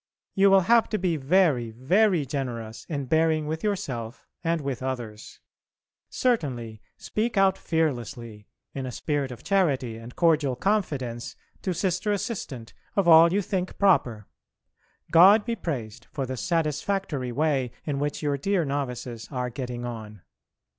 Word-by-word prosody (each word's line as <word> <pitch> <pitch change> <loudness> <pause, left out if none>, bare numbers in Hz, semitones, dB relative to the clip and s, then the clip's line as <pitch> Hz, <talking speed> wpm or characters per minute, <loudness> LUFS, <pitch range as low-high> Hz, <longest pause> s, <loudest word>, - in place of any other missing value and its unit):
You 195 0 +5
will 195 0 +6
have 230 +5 +4
to 215 - 0
be 180 -3 0
very 145 -5 +2
very 170 - +2
generous 120 -5 -5
in 140 -4 -3
bearing 160 +2 +2
with 160 +1 -4
yourself 130 - -3 0.2
and 165 0 +1
with 135 -4 -4
others. 120 -5 -6 0.7
Certainly, 125 - -1 0.2
speak 225 +1 -2
out 195 -1 +4
fearlessly, 120 - -3 0.3
in 135 -1 -4
a - - -4
spirit 145 +1 -2
of 125 -1 -10
charity 140 - +1
and 115 +2 -11
cordial 155 -6 +2
confidence, 130 - -2 0.3
to 190 - -2
Sister 185 +3 0
Assistant 175 - -4 0.2
of 200 -3 +2
all 165 0 +8
you 200 +2 +1
think 185 -1 -3
proper. 125 - +2 0.9
God 195 +6 +7
be 235 -1 -1
praised 125 - -5
for 135 -3 -3
the 130 +1 -4
satisfactory 150 - -1
way 140 -2 +1 0.2
in 140 -3 -2
which 145 +1 -2
your 145 -1 0
dear 190 +1 +1
novices 125 -4 -4
are 125 -2 -3
getting 120 -1 -5
on. 110 -5 -8
145 Hz, 145 wpm, -26 LUFS, 125-180 Hz, 0.9 s, all